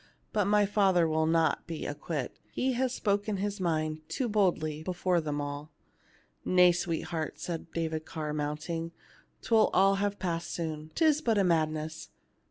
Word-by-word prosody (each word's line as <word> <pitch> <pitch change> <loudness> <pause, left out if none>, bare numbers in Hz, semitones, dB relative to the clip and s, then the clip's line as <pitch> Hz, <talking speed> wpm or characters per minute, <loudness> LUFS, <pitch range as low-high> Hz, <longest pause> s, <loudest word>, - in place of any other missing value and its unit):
But 210 -2 +2
my 205 +1 +4
father 195 -4 +3
will 160 0 +1
not 165 0 +2
be 165 -2 -5
acquit; 145 -2 -4
he 260 0 0
has 255 +1 0
spoken 205 -2 0
his 205 +1 -2
mind 155 -3 -1
too 255 - -1
boldly 175 -8 +1
before 180 0 0
them 150 -2 -3
all." 145 +1 -5 0.7
"Nay, 180 -1 +6
sweetheart," 170 -2 -3
said 165 -1 -5
David 160 -1 -2
Carr, 155 -2 -4
mount 150 0 -3
ing, 165 0 -3 0.2
" - - -32
'twill 225 -2 +4
all 195 +1 +5
have 205 0 0
passed 170 -3 -2
soon; 155 -2 -4
'tis 310 -2 +3
but 225 -6 +2
a 200 - +4
mad 165 -4 +3
ness. 155 0 -6
170 Hz, 170 wpm, -30 LUFS, 155-200 Hz, 0.7 s, Nay